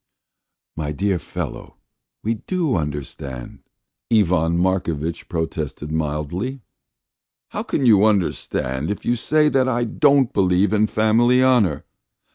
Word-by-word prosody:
"My 75 Hz, -2 st, -3 dB
dear 95 Hz, +4 st, 0 dB
fellow, -, -, -7 dB, 0.5 s
we 115 Hz, -, 0 dB
do 175 Hz, -8 st, 0 dB
understand," 70 Hz, -4 st, -5 dB, 0.5 s
Ivan 90 Hz, -6 st, +3 dB
Markovitch 85 Hz, -3 st, -1 dB
protested 80 Hz, -2 st, -4 dB
mildly. 80 Hz, -, -3 dB, 0.9 s
"How -, -, -4 dB
can 135 Hz, -, -1 dB
you 105 Hz, -3 st, +6 dB
understand 80 Hz, -8 st, -1 dB
if 105 Hz, -, -4 dB
you 120 Hz, -, +2 dB
say 150 Hz, +6 st, +2 dB
that 130 Hz, -2 st, +2 dB
I 120 Hz, -1 st, 0 dB
don't 140 Hz, +2 st, +3 dB
believe 95 Hz, +1 st, +2 dB
in 110 Hz, 0 st, +3 dB
family 115 Hz, +4 st, +3 dB
honour? 115 Hz, -, +2 dB
95 Hz, 115 wpm, -21 LUFS, 80-120 Hz, 0.9 s, you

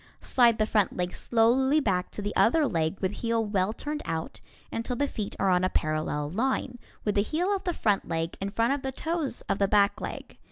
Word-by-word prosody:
Slide 235 Hz, -3 st, +3 dB
the 215 Hz, -, +2 dB
front 210 Hz, -3 st, +1 dB
leg 180 Hz, 0 st, -2 dB
slowly 255 Hz, +5 st, +3 dB
back 190 Hz, -9 st, 0 dB
to 205 Hz, -, -6 dB
the 205 Hz, -, -3 dB
other 300 Hz, +7 st, +4 dB
leg 160 Hz, -, 0 dB
with 190 Hz, -1 st, 0 dB
heel 230 Hz, -1 st, +1 dB
well 200 Hz, -1 st, 0 dB
turned 295 Hz, +6 st, -4 dB
out, 160 Hz, 0 st, -4 dB, 0.3 s
until 230 Hz, +2 st, -2 dB
the 285 Hz, +3 st, 0 dB
feet 215 Hz, -6 st, -5 dB
are 195 Hz, -, +3 dB
on 180 Hz, 0 st, +3 dB
a 185 Hz, -, +2 dB
parallel 155 Hz, -2 st, -1 dB
line, 245 Hz, +3 st, -1 dB, 0.3 s
with 210 Hz, -, +1 dB
the 200 Hz, -, +3 dB
heel 350 Hz, -, 0 dB
of 385 Hz, -, -6 dB
the 355 Hz, -, 0 dB
front 205 Hz, -2 st, +1 dB
leg 165 Hz, 0 st, -2 dB
in 195 Hz, -, -1 dB
front 230 Hz, +5 st, +1 dB
of 285 Hz, -, -3 dB
the 265 Hz, -, -3 dB
toes 320 Hz, +1 st, -2 dB
of -, -, -2 dB
the 200 Hz, -, +3 dB
back 200 Hz, 0 st, +3 dB
leg. -, -, -7 dB
220 Hz, 225 wpm, -27 LUFS, 185-265 Hz, 0.3 s, other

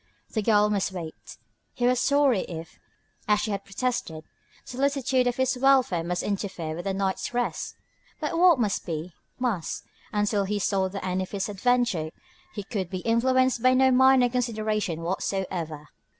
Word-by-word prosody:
The 220 Hz, -, 0 dB
girl 210 Hz, -1 st, +4 dB
must 200 Hz, -1 st, 0 dB
wait. 170 Hz, -4 st, -8 dB, 0.4 s
He 245 Hz, -, -1 dB
was 250 Hz, 0 st, +3 dB
sorry 280 Hz, -6 st, +3 dB
if, 165 Hz, -1 st, -8 dB, 0.5 s
as 210 Hz, -1 st, +4 dB
she 215 Hz, -, -2 dB
had 200 Hz, -1 st, -3 dB
protested, 200 Hz, -7 st, -3 dB, 0.4 s
solicitude 265 Hz, -1 st, +1 dB
for 245 Hz, +1 st, -1 dB
his 260 Hz, 0 st, 0 dB
welfare 260 Hz, -10 st, +3 dB
must 175 Hz, +1 st, -2 dB
interfere 190 Hz, -6 st, -3 dB
with 175 Hz, +4 st, -5 dB
her 195 Hz, -, 0 dB
night's 195 Hz, +4 st, -2 dB
rest. 245 Hz, 0 st, -2 dB, 0.4 s
But 305 Hz, +1 st, -2 dB
what 345 Hz, -4 st, +5 dB
must 210 Hz, -4 st, 0 dB
be, 165 Hz, 0 st, -5 dB, 0.2 s
must: 230 Hz, -10 st, -2 dB, 0.3 s
until 205 Hz, -1 st, +1 dB
he 210 Hz, +2 st, -1 dB
saw 195 Hz, -1 st, +1 dB
the 195 Hz, 0 st, -6 dB
end 185 Hz, 0 st, -1 dB
of 185 Hz, -, -4 dB
this 200 Hz, 0 st, -3 dB
adventure 205 Hz, -6 st, +1 dB, 0.5 s
he 205 Hz, -, -4 dB
could 195 Hz, -4 st, -4 dB
be 185 Hz, -2 st, -4 dB
influenced 255 Hz, +2 st, +2 dB
by 255 Hz, +1 st, +5 dB
no 260 Hz, 0 st, +5 dB
minor 260 Hz, 0 st, +6 dB
consideration 215 Hz, -8 st, -1 dB
whatsoever. 170 Hz, -4 st, -3 dB
210 Hz, 165 wpm, -26 LUFS, 185-250 Hz, 0.5 s, minor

